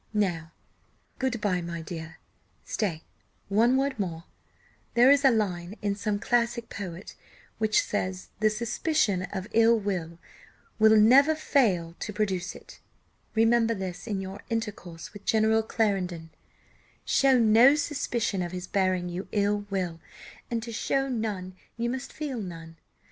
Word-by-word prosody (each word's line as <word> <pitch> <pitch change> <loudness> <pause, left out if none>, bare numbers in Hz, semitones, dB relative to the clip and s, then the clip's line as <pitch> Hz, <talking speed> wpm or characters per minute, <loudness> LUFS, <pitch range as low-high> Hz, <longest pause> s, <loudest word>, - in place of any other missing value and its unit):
Now 170 -6 0 0.7
good 260 -3 -1
bye, 185 -4 0
my 170 -1 -5
dear; 160 0 -8 0.5
stay, 170 -7 -2 0.5
one 230 +6 +4
word 270 -3 -1
more 170 -4 -3 0.7
there 245 +3 +7
is 285 0 +4
a 270 - +7
line 195 -5 -1
in 205 -1 +1
some 205 0 -1
classic 235 +1 0
poet, 185 -2 -7 0.5
which 215 -1 +3
says 185 -2 -3
'the 215 0 +4
suspicion 225 - 0
of 190 0 -4
ill 230 0 +5
will 180 -6 -3 0.8
never 270 +8 +6
fails 200 - +1
to 210 - -5
produce 195 -3 -2
it' - - -14 0.6
Remember 225 0 +3
this 185 0 -6
in 200 -4 -2
your 195 +2 -7
intercourse 210 -7 -5
with 205 -1 -11
General 220 0 +3
Clarendon; 185 -7 -1 0.7
show 270 -1 +4
no 235 +4 +6
suspicion 250 -9 -1
of 175 0 -4
his 180 0 -5
bearing 185 -2 0
you 180 +2 -5
ill 205 0 0
will, 180 -4 -2 0.5
and 230 -2 -2
to 235 - -6
show 270 +4 -1
none, 205 -6 -3 0.2
you 235 +1 -1
must 260 +1 -5
feel 280 -7 -4
none. 165 -3 -8
210 Hz, 140 wpm, -27 LUFS, 185-235 Hz, 0.8 s, there